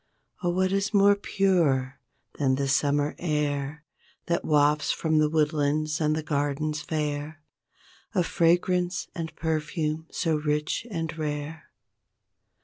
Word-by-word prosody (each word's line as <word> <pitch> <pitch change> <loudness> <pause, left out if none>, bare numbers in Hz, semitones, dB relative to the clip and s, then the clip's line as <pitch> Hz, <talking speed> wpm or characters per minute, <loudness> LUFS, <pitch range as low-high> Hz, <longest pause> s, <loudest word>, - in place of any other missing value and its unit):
Oh 175 - 0
what 185 +1 +1
is 195 +2 0
more 200 0 +6
pure 160 -10 +1 0.4
than 135 -2 +2
the 140 +1 -1
summer 145 +2 +1
air 150 -2 -2 0.4
That 170 0 0
wafts 150 0 +3
from 160 -1 +1
the 155 0 +3
woodlands 150 0 +1
and 155 0 0
gardens 150 +1 -1
fair 150 0 -3 0.7
A 180 - +3
fragrance 175 +1 +1
and 165 -2 -5
perfume 160 0 -2
so 160 -2 0
rich 150 +7 -1
and 165 -5 -3
rare? 150 0 -4
155 Hz, 120 wpm, -26 LUFS, 145-170 Hz, 0.7 s, more